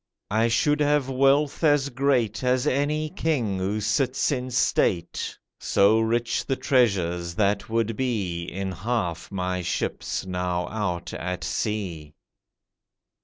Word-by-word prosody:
I 110 +2 +3
should 145 +6 +2
have 145 -2 +2
wealth 140 +4 +2
as 145 -3 +3
great 125 -5 +1
As 125 0 +2
any 150 +3 +1
king 130 - -1
who 100 +3 -1
sits 120 +7 +1
in 130 -2 -2
state— 90 -8 0 0.2
So 105 +3 +4
rich 115 +1 0
the 135 - -1
treasures 95 -10 +1
that 100 +1 +1
would 115 0 0
be 100 -10 -2
In 95 +2 -4
half 95 -2 -3
my 90 -1 -2
ships 90 - -2
now 90 -1 -2
out 90 -6 -3
at 90 +1 -4
sea. 90 -9 -3
110 Hz, 125 wpm, -25 LUFS, 90-130 Hz, 0.2 s, So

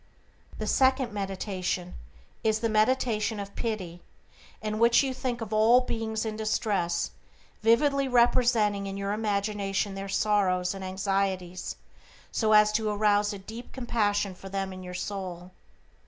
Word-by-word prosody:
"The - - -3
second 260 -3 +2
meditation 190 -2 -3 0.5
is 220 0 +1
the 230 - +1
meditation 220 -1 +1
of 200 0 -7
pity, 185 -7 -4 0.6
in 215 0 -3
which 235 +3 +5
you 265 -1 -1
think 250 -2 -3
of 220 -1 -5
all 225 +4 +6
beings 225 -2 -3
in 215 -1 -3
distress, 205 -5 0 0.5
vividly 275 +5 +3
representing 235 -5 +3
in 195 0 -5
your 200 0 -2
imagination 205 -1 -1
their 195 0 -6
sorrows 190 -3 +1
and 195 -1 -7
anxieties 190 -1 -2 0.6
so 220 -2 +2
as 210 0 +6
to 215 0 0
arouse 210 0 +2
a 205 - -5
deep 220 +5 -10
compassion 205 -6 0
for 195 +1 -11
them 195 -1 -3
in 185 - -9
your 180 0 -7
soul. 180 -2 -5
210 Hz, 140 wpm, -28 LUFS, 195-225 Hz, 0.6 s, all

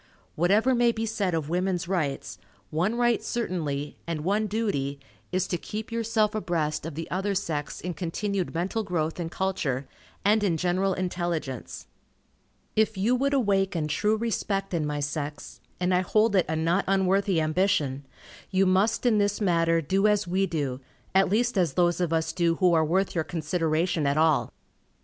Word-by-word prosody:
Whatever 205 +10 +3
may 240 -1 +4
be 225 0 -3
said 200 -5 -1
of 155 -3 -2
"women's 180 +1 -1
rights," 145 - -2 0.3
one 180 +9 0
right 240 -1 +2
certainly, 155 -11 -3
and 165 -2 -2
one 205 +5 +1
duty, 190 -11 -1 0.3
is 185 0 +1
to 175 - -2
keep 215 +1 -6
yourself 225 -2 +1
abreast 165 -7 -1
of 160 - -7
the 165 +1 -5
other 195 +2 -1
sex 150 -6 -3
in 180 0 -4
continued 185 +3 -2
mental 180 +7 -1
growth 165 -3 -2
and 165 -1 -3
culture, 155 -9 -2 0.4
and 210 +1 +4
in 175 -5 +1
general 185 +3 +1
intelligence. 175 -7 -3 0.9
If 220 -1 +2
you 220 +6 +2
would 280 +2 +1
awaken 195 - +1
true 210 +9 +1
respect 205 -4 -2
in 160 -3 0
my 145 0 -2
sex, 145 -5 -5 0.2
and 180 +1 +1
I 180 - +3
hold 215 +3 +2
it 185 - +3
a 160 - 0
not 165 +4 +1
unworthy 195 -1 +2
ambition, 155 -4 +1 0.5
you 195 0 +3
must 190 +6 +2
in 225 -4 +4
this 205 0 +1
matter 165 -4 +2
do 195 +7 +2
as 210 -2 +2
we 190 +2 +1
do, 140 -6 -3 0.3
at 195 0 +4
least 230 +1 +1
as 170 -6 +1
those 175 +1 +2
of 175 -2 0
us 160 0 0
do 170 -1 +2
who 180 0 +3
are 160 -1 +4
worth 185 +5 +1
your 160 - 0
consideration 160 -1 0
at 140 +1 +1
all. 155 -2 +3
180 Hz, 175 wpm, -26 LUFS, 160-205 Hz, 0.9 s, may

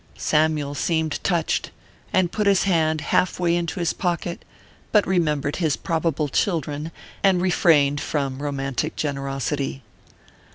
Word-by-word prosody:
Samyule 150 -2 +1
seemed 160 0 -1
touched, 170 -4 0 0.4
and 185 -2 +2
put 210 -1 0
his 200 -2 +4
hand 160 -5 +2
half 180 +3 +1
way 170 -1 +2
into 175 +2 -2
his 170 -2 0
pocket, 175 -1 -2 0.5
but 210 -3 +4
remembered 150 -6 0
his 160 -6 +1
probable 160 -2 -1
children, 155 - -1 0.3
and 190 -2 +4
refrained 155 -6 +3
from 140 -2 -2
romantic 140 +1 -2
generosity. 135 -1 -3
160 Hz, 125 wpm, -23 LUFS, 145-175 Hz, 0.5 s, his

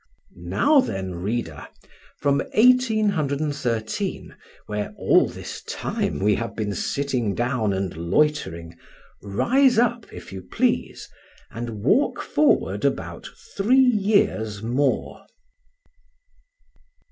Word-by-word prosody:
Now 295 0 +2
then, 95 - -4
reader, 90 -7 -4 0.5
from 140 -1 +1 0.2
1813, 160 - +1 0.3
where 105 -1 -4
all - - +4
this - - -8
time - - -2
we 105 +2 +2
have 115 +2 -3
been 105 -2 -2
sitting 125 -4 -1
down 120 -3 0
and 95 -2 -3
loitering, 85 - -1 0.5
rise 245 - +2
up, 235 -1 +1
if - - -10
you 95 - -6
please, - - -1 0.4
and 115 -3 -6
walk 240 - +2
forward 300 - +1
about - - -2 0.3
three 225 +7 +3
years 200 - +2
more. 130 +4 -1
130 Hz, 100 wpm, -23 LUFS, -, 0.5 s, all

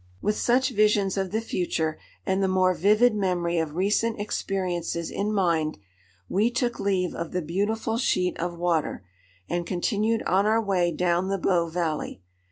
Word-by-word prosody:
With 210 - 0
such 255 +4 +2
visions 210 -3 +2
of 190 -1 -1
the 220 +4 -1
future 160 -7 -2 0.3
and 190 +1 +1
the 195 - +2
more 185 -1 +3
vivid 215 +6 +4
memory 175 -4 0
of 160 -2 -3
recent 210 +4 +1
experiences 180 -5 -2
in 205 +1 -1
mind, 170 -6 +1 0.5
we 210 - +2
took 240 0 -1
leave 185 -3 0
of 170 -1 -5
the 180 - 0
beautiful 210 +7 -1
sheet 180 -7 +1
of 175 0 -3
water, 170 - -1 0.4
and 175 0 -1
continued 210 +6 0
on 195 +3 +2
our 220 +1 +3
way 190 -5 +1
down 175 +2 +1
the 195 0 0
Bow 175 -2 +1
valley. 160 - -2
190 Hz, 165 wpm, -26 LUFS, 175-210 Hz, 0.5 s, vivid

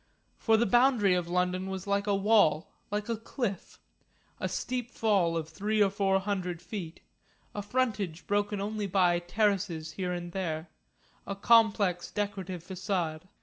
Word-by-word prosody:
For 225 -1 +4
the 235 - +3
boundary 240 -3 +4
of 180 -1 0
London 180 +1 0
was 190 -1 -5
like 200 +1 0
a 200 - +3
wall, 195 -5 +3 0.2
like 210 0 -2
a 230 - 0
cliff, 225 -3 -4 0.6
a - - -2
steep 250 -2 -3
fall 195 -8 +1
of 160 -1 -3
three 215 +5 -1
or 200 -2 +4
four 195 -1 +2
hundred 190 -3 -3
feet, 175 -4 -7 0.5
a 205 - -3
frontage 205 -6 -1
broken 205 0 0
only 210 +1 -2
by 180 -2 +3
terraces 175 -3 0
here 180 +2 -3
and 175 -1 -4
there, 165 -3 -3 0.6
a 200 - -3
complex 200 -4 +3
decorative 195 -4 -4
façade. 185 -3 -3
195 Hz, 150 wpm, -29 LUFS, 180-210 Hz, 0.6 s, For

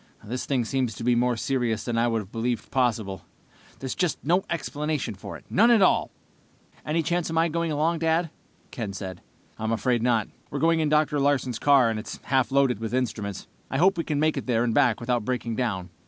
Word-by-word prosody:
"This 120 +4 -4
thing 130 -4 +1
seems 125 -2 -1
to 115 - -7
be 120 +1 +3
more 120 0 +2
serious 120 -3 -1
than 120 - -2
I 115 +1 +2
would 115 -2 0
have 95 - -18
believed 120 +1 -2
possible. 110 -7 0 0.6
There's 130 -1 -4
just 180 -4 0
no 180 +5 +3
explanation 150 -6 -2
for 100 - -8
it, - - -20
none 230 +5 +4
at 230 -4 +6
all!" - - +3 0.7
"Any 160 +2 0
chance 175 +1 -1
of 165 - -3
my 165 +1 +3
going 170 0 -1
along, 160 +3 +1
Dad?" 165 0 +1 0.4
Ken 110 -5 -4
said. 95 -2 -7 0.4
"I'm 110 +1 -1
afraid 120 +1 +1
not. 115 -3 +2 0.2
We're 140 - -4
going 165 +2 +3
in 155 -2 +1
Dr. 150 -1 +2
Larsen's 135 -4 +1
car, 140 -4 +5
and 110 - -3
it's 110 - -7
half 130 -3 +1
loaded 135 -5 +3
with 115 +2 -3
instruments. 110 -6 -3 0.2
I 135 - -1
hope 190 +6 +4
we 165 -3 -2
make 155 +2 +1
it - - -4
there 120 -2 +2
and 120 -2 0
back 125 -5 +3
without 120 -1 -1
breaking 120 -1 -2
down. 100 -8 -2
130 Hz, 215 wpm, -26 LUFS, 115-155 Hz, 0.7 s, at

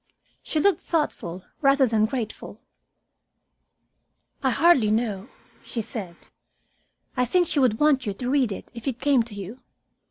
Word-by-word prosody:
She 310 - -2
looked 400 +5 +3
thoughtful 185 - -2 0.2
rather 275 -1 +5
than 220 -2 +2
grateful. 230 -3 -5 1.8
"I 265 - +2
hardly 265 -5 +4
know," 215 -1 -1 0.3
she 230 - -4
said. 200 -6 -7 0.9
"I 250 - +2
think 355 +7 +2
she 295 - 0
would 245 -5 +2
want 290 -5 +3
you 200 - -2
to 250 +4 -3
read 270 -6 +2
it 195 - -7
if 235 +2 -9
it 255 -4 -1
came 280 -3 +3
to 225 -2 -7
you. 205 +5 -8
245 Hz, 150 wpm, -25 LUFS, 215-280 Hz, 1.8 s, rather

